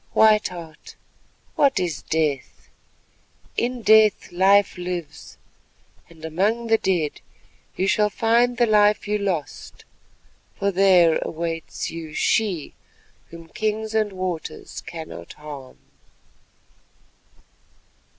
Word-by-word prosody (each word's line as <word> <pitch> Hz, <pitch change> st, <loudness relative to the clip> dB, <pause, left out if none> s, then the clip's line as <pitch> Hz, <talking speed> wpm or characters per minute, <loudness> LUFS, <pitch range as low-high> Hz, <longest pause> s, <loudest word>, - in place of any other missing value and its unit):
White 215 Hz, -1 st, +5 dB
Heart, 165 Hz, -4 st, -11 dB, 0.6 s
what 275 Hz, -1 st, +3 dB
is 170 Hz, -5 st, -2 dB
death? 155 Hz, -4 st, -2 dB, 0.9 s
In 245 Hz, 0 st, -2 dB
death 215 Hz, -1 st, +4 dB
life 195 Hz, +3 st, +4 dB
lives, 180 Hz, -3 st, -6 dB, 0.7 s
and 160 Hz, -1 st, -12 dB
among 205 Hz, +9 st, 0 dB
the 225 Hz, -1 st, +3 dB
dead 170 Hz, -6 st, -1 dB, 0.5 s
you 190 Hz, -, 0 dB
shall 210 Hz, +2 st, +2 dB
find 235 Hz, +3 st, +2 dB
the 240 Hz, -, +4 dB
life 210 Hz, -1 st, +3 dB
you 210 Hz, 0 st, 0 dB
lost, 185 Hz, -8 st, -4 dB, 0.7 s
for 200 Hz, 0 st, 0 dB
there 180 Hz, -4 st, +4 dB
awaits 165 Hz, 0 st, -4 dB
you 160 Hz, -2 st, -8 dB
she 190 Hz, -9 st, 0 dB, 0.6 s
whom 165 Hz, 0 st, -12 dB
kings 220 Hz, +2 st, -2 dB
and 215 Hz, -2 st, +1 dB
waters 185 Hz, -3 st, -5 dB
cannot 120 Hz, -, -9 dB
harm." 145 Hz, -, -10 dB
185 Hz, 100 wpm, -23 LUFS, 165-215 Hz, 0.9 s, White